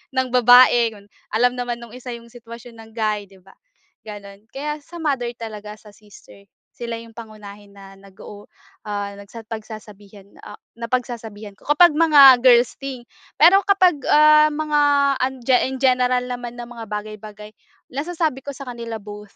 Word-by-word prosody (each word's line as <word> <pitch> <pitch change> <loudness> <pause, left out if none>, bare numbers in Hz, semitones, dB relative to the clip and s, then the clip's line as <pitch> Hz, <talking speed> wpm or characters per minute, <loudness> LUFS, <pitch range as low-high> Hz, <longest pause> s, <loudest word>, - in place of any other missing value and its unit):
ng 260 0 0
babae 245 -1 +5
yun 200 - -18 0.3
alam 245 +3 +2
naman 245 -1 -4
nung 235 -1 -12
isa 250 0 -9
yung 235 0 -14
sitwasyon 235 0 -13
ng 225 0 -16
guy 215 -2 -2
di 195 -1 -20
ba, 195 +1 -21 0.5
ganun. 200 -1 -11
Kaya 300 +2 -5
sa 345 - -12
mother 270 -6 -1
talaga, 210 -2 -9
sa 210 - -17
sister, 200 -1 -18 0.3
sila 235 -1 -6
yung 230 0 -14
pangunahin 210 -3 -12
na 195 -1 -15
nag 195 0 -18
oo 205 0 -12 0.4
ah 205 -1 -4
nagsa 200 +3 -11
pagsasabihan, 210 -2 -11 0.2
ah - - -10 0.2
napagsasabihan 230 -3 -5
ko - - -24
kapag 345 +4 +6
mga 290 -5 +7
girls 245 -1 +4
thing 270 -3 -7 0.4
pero 365 +5 +6
kapag 370 -5 +3
ah, 305 0 +6
mga 300 0 -1 0.4
an 260 +1 0
ge 250 +1 +3
in 265 - -6
general 250 -1 +2
naman 245 -1 -7
na 240 0 -9
mga 235 -2 -9
bagay-bagay 210 0 -8 0.4
nasasabi 310 -1 -3
ko 285 - -6
sa 275 0 -10
kanila 235 -2 -7
both 210 0 -12
235 Hz, 165 wpm, -20 LUFS, 210-260 Hz, 0.5 s, mga